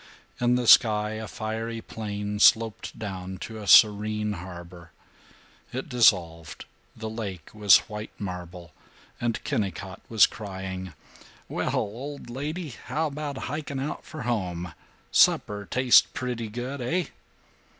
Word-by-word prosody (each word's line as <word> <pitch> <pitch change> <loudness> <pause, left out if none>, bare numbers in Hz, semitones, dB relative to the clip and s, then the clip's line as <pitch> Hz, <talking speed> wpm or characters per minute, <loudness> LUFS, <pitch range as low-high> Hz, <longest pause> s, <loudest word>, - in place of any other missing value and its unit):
In 120 0 +3
the 125 -1 0
sky 105 -2 +6
a 110 0 -5
fiery 115 +1 -4
plain 105 -2 -5
sloped 110 +1 +3
down 95 -3 -6
to 110 -1 -6
a 105 - -8
serene 105 0 +5
harbor. 85 -1 -10 0.8
It 130 +4 -5
dissolved; 85 - +2 0.3
the 110 0 -6
lake 100 -7 -6
was 105 -2 +7
white 105 0 -6
marble; 90 -3 -7 0.5
and 120 -1 -1
Kennicott 95 -2 -3
was 110 -3 +6
crying, 95 -3 -6 0.5
"Well, - - -2
old 125 +3 -4
lady, 150 +6 -4
how 155 +5 -3
about 145 -2 -4
hiking 145 -2 -4
out 140 +3 -4
for 155 - -8
home? 90 -7 -2 0.4
Supper 105 -1 +3
taste 130 -1 +5
pretty 120 -3 -3
good, 125 +5 -5
eh?" 170 +8 0
110 Hz, 125 wpm, -26 LUFS, 95-125 Hz, 0.8 s, was